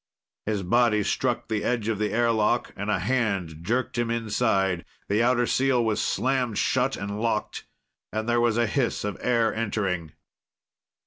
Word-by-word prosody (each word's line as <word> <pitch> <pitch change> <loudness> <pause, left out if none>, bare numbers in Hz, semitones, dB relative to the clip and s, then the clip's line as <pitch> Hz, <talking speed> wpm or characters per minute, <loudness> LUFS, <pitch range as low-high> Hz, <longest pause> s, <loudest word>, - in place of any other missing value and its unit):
His 105 -3 -1
body 105 +2 +3
struck 120 +3 -1
the 110 -2 -1
edge 115 -3 -1
of 110 -3 -1
the 105 -1 0
airlock 115 0 +1
and 100 +2 -4
a 105 - +2
hand 100 -6 -1
jerked 120 +6 -1
him 120 -1 0
inside. 105 -6 0 0.3
The 105 +3 +2
outer 120 0 +3
seal 130 -1 +2
was 110 -1 0
slammed 125 -1 0
shut 130 +1 +1
and 100 +2 -4
locked, 115 -2 -2 0.4
and 110 +1 -3
there 120 0 +2
was 120 -1 +2
a 120 - +3
hiss 120 +2 -1
of 105 -2 -2
air 115 -2 +2
entering. 95 -7 -2
115 Hz, 165 wpm, -26 LUFS, 105-120 Hz, 0.4 s, body